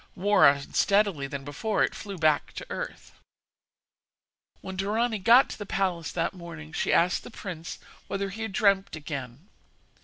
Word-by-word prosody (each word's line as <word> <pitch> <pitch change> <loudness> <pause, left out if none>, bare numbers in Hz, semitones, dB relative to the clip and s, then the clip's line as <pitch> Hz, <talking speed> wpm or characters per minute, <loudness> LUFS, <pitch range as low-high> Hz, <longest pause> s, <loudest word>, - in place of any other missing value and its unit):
More 200 -4 +5
unsteadily 150 +3 +1
than 140 0 -6
before, 205 +9 0
it - - 0
flew 200 -2 -7
back 155 -2 +2
to - - -7
earth. - - -6 1.5
When 190 - -7
Dorani 215 +4 0
got 235 +7 +6
to - - -8
the 205 - -5
palace 180 -5 -1
that 170 +1 -1
morning 165 -4 -10
she - - 0
asked 175 +1 +3
the - - -9
prince 180 -7 -7 0.3
whether 195 0 -3
he 220 +4 -7
had 220 -2 -3
dreamt 200 -3 +2
again. 145 0 -7
190 Hz, 155 wpm, -27 LUFS, 160-205 Hz, 1.5 s, got